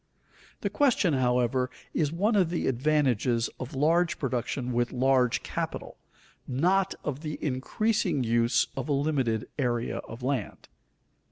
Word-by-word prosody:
The - - -2
question, 245 - +3
however, 125 0 +1 0.2
is 150 -3 +1
one 205 +7 +1
of 185 -5 +3
the 170 - -2
advantages 130 -4 +1
of 130 +2 -6
large 165 +5 +2
production 125 -1 -2
with 120 0 0
large 130 -1 +2
capital, - - -5 0.5
not 180 +9 +1
of 145 -2 -3
the 155 -1 -5
increasing 150 - 0
use 115 +1 +2
of - - -4
a - - +2
limited 135 -6 0
area 120 -3 0
of 115 +2 -8
land. 130 -6 -3
135 Hz, 135 wpm, -28 LUFS, 125-155 Hz, 0.5 s, question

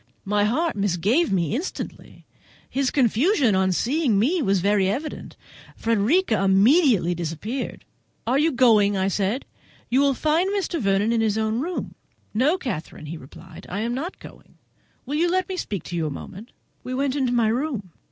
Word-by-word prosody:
My 205 +1 +2
heart 315 +10 0
misgave 205 - +1
me 170 -5 0
instantly. 330 +9 -6 0.4
His 270 -1 0
confusion 255 - +2
at 190 0 +2
seeing 260 - +1
me 305 - +2
was 195 -6 +2
very 195 0 +2
evident. 285 +10 -5 0.4
Frederica 230 - +1
immediately 200 - +4
disappeared. 175 - -5 0.4
"Are 255 +4 +2
you 320 +2 +3
going?" 215 -6 +4
I 190 0 +1
said; 200 +6 -1 0.5
"you 255 - +4
will 280 -1 +3
find 320 +7 +1
Mr. 390 -5 -2
Vernon 200 +2 +2
in 230 -1 +2
his 220 -1 +1
own 220 +1 0
room." 345 +6 -4 0.4
"No, 275 - +2
Catherine," 190 - -6
he 160 +3 -6
replied, 135 -1 -13
"I 200 +4 -3
am 235 +2 -1
not 315 +9 -4
going. - - -15 0.5
Will 275 - -5
you 345 +2 +2
let 370 +1 0
me 380 - -4
speak 200 - -4
to 175 - -6
you 165 -2 -1
a - - -2
moment?" 195 - -9 0.3
We 255 - -4
went 275 0 0
into 260 -4 0
my 235 -3 +2
room. 235 - -2
230 Hz, 170 wpm, -23 LUFS, 195-285 Hz, 0.5 s, immediately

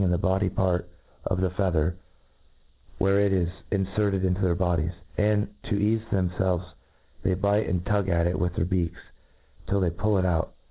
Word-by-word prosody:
in 90 - +2
the 90 - +2
bloody 95 +2 +1
part 90 -2 0 0.4
of 90 - 0
the 95 - +2
feather, 90 -3 +1 1.0
where 100 +1 +3
it 100 -1 +3
ik 90 -3 +2 0.2
Iffferted 95 0 0
into 90 +1 0
their 90 -2 +2
bodies; 85 -2 0 0.2
and, 105 0 +2 0.2
to - - +1
eafc 110 +2 +1
them 90 -3 +1
felvcs, 90 -1 0 0.5
they 95 - +2
bite 100 +3 +1
and 90 0 -1
tug 100 -2 +1
at 85 -1 +2
it 85 - 0
with 90 0 -1
their - - +1
beaks, 90 -2 -1 0.7
tilt 100 -1 +2
they 85 - +1
pull 100 +4 +1
it 95 - +2
out. 85 -2 0
95 Hz, 185 wpm, -26 LUFS, 90-100 Hz, 1.0 s, where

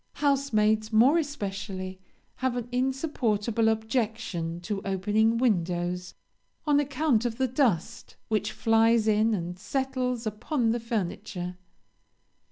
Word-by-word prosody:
Housemaids, 220 -7 +1
more 250 +9 +5
especially, 195 - -4 0.4
have 260 -1 -1
an 240 -1 -3
insupportable 245 -4 0
objection 220 -7 -2
to 195 +2 -3
opening 210 +4 +1
windows, 180 -5 0 0.5
on 295 -2 +4
account 280 -4 +1
of 235 -2 -2
the 260 0 +1
dust 235 - 0
which 215 -1 0
flies 225 0 +3
in 215 +1 +3
and 175 -1 -5
settles 255 0 -2
upon 225 +3 0
the 240 - 0
furniture. 200 -4 -3
225 Hz, 110 wpm, -27 LUFS, 205-250 Hz, 0.5 s, more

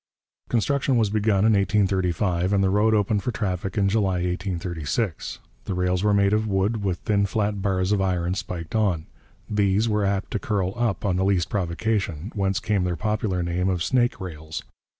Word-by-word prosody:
Construction 135 +2 +1
was 110 -3 +2
begun 105 -1 +2
in 110 - +5
1835, 95 -2 +1
and 100 -1 +3
the 95 - +2
road 110 +2 +3
opened 105 0 +1
for 125 - -2
traffic 95 -3 -3
in 100 -1 +3
July 100 -2 +1
1836. 90 0 -2 0.3
The 95 - -3
rails 90 +1 0
were 105 - +3
of 105 +2 +2
wood, 100 +2 0
with 95 -3 0
thin 100 -2 +1
flat 105 -1 -1
bars 95 -1 0
of 105 -2 +2
iron 90 -2 0
spiked 85 -3 -5
on. 100 -8 +1 0.4
These 105 +1 +2
were 105 -2 +1
apt 100 0 -1
to - - -1
curl 100 -8 -1
up 115 -5 -1
on 95 -3 +1
the 95 - +1
least 95 -3 +1
provocation, 95 -1 -1
whence 100 -2 0
came 105 -4 0
their 90 -1 -1
popular 105 0 -1
name 90 +2 0
of 90 -3 0
'snake 120 -4 +1
rails.' 80 -4 -6
100 Hz, 180 wpm, -24 LUFS, 90-105 Hz, 0.4 s, in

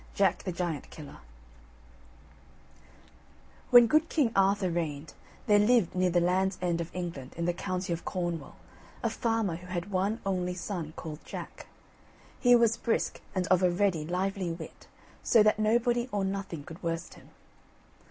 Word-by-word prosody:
JACK 195 -1 +2
THE 185 - -1
GIANT 170 -5 -3
KILLER 150 -2 -11 2.5
When 245 -1 +9
good 310 +6 +2
King 275 -8 +2
Arthur 195 -1 +3
reigned, 155 -3 -3 0.3
there 205 -1 +5
lived 220 -3 +3
near 185 0 +2
the 175 0 +3
Land's 185 +2 +1
End 175 -2 0
of 165 - -5
England, 165 -8 -5
in 170 - -1
the 175 - +1
county 185 -1 -3
of 170 - -5
Cornwall, 175 -3 -4 0.5
a - - +1
farmer 225 -7 -1
who 180 +1 -12
had 180 +2 -4
one 200 +4 0
only 180 -2 -1
son 170 -4 -5
called 155 -1 -8
Jack. - - -8 0.7
He 245 -1 +6
was 230 -1 +3
brisk 230 - -1
and 185 -1 0
of 185 -1 +4
a 180 - +4
ready 175 -3 +1
lively 185 +2 -2
wit, 165 -1 -9 0.3
so 225 -3 +5
that 215 0 +3
nobody 240 +3 +2
or 200 -2 0
nothing 190 -6 -4
could 160 +3 -11
worst 165 -1 -3
him. - - -17
185 Hz, 160 wpm, -29 LUFS, 170-205 Hz, 2.5 s, When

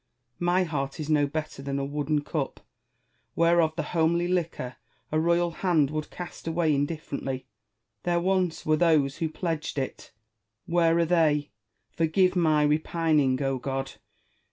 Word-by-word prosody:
My 175 +1 +2
heart 140 -3 -3
is 155 0 -3
no 145 -2 +3
better 155 -1 -5
than 140 0 -3
a 140 - -1
wooden 145 +1 -1
cup, 145 -2 -4 0.7
whereof 170 -1 +3
the 165 - -2
homely 170 +1 +2
liquor 170 -8 -2 0.3
a 155 - +2
royal 170 +1 +2
hand 160 -5 +1
would 155 0 -3
cast 175 -2 -8
away 165 -1 +2
indifferently. 140 -2 -3 0.6
There 175 -1 +1
once 185 -1 0
were 155 0 +3
those 150 -5 +3
who 165 -2 -1
pledged 160 -2 -3
it! 135 -1 -4 0.5
where 170 -2 +3
are 170 - +3
they? 155 -4 +2 0.4
Forgive 180 +3 +2
my 155 -4 +3
repining, 150 -3 +2
O 135 -1 0
God 135 +1 -3
160 Hz, 145 wpm, -27 LUFS, 145-170 Hz, 0.7 s, no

